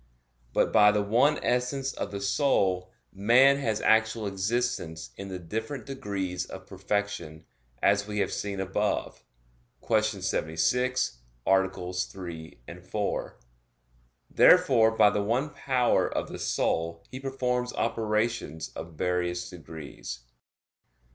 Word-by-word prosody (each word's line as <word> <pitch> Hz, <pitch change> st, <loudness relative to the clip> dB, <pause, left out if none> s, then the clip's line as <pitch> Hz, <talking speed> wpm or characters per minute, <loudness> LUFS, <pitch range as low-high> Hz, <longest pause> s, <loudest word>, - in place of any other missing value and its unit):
But -, -, +1 dB
by 105 Hz, 0 st, +7 dB
the 105 Hz, 0 st, +1 dB
one 125 Hz, +9 st, +3 dB
essence 130 Hz, +2 st, 0 dB
of -, -, -4 dB
the 100 Hz, -1 st, -5 dB
soul, 95 Hz, -5 st, +1 dB, 0.2 s
man 120 Hz, +8 st, +5 dB
has 110 Hz, -6 st, -1 dB
actual 110 Hz, 0 st, +3 dB
existence 95 Hz, -4 st, -2 dB
in 100 Hz, -, -7 dB
the 95 Hz, -1 st, -5 dB
different 110 Hz, -, -5 dB
degrees 95 Hz, -9 st, -3 dB
of 95 Hz, 0 st, -9 dB
perfection, 100 Hz, -5 st, -3 dB, 0.4 s
as 100 Hz, +1 st, +3 dB
we 105 Hz, 0 st, -4 dB
have 100 Hz, -, 0 dB
seen 100 Hz, -1 st, -3 dB
above 95 Hz, +2 st, -2 dB, 0.6 s
(Q. 110 Hz, -2 st, +4 dB, 0.2 s
76, 95 Hz, -, 0 dB, 0.3 s
AA. 95 Hz, -1 st, +1 dB
3, 90 Hz, -3 st, -5 dB, 0.2 s
4). 100 Hz, +3 st, -3 dB, 0.9 s
Therefore 115 Hz, -4 st, +6 dB
by 105 Hz, -, +6 dB
the 105 Hz, -, 0 dB
one 125 Hz, +8 st, 0 dB
power 130 Hz, -4 st, +1 dB
of -, -, -2 dB
the -, -, -7 dB
soul 85 Hz, 0 st, -1 dB
he 130 Hz, -, -6 dB
performs 125 Hz, -2 st, -1 dB
operations 110 Hz, -7 st, -1 dB
of 80 Hz, +1 st, -9 dB
various 90 Hz, +2 st, -1 dB
degrees. 80 Hz, -7 st, -8 dB
100 Hz, 120 wpm, -28 LUFS, 90-120 Hz, 0.9 s, by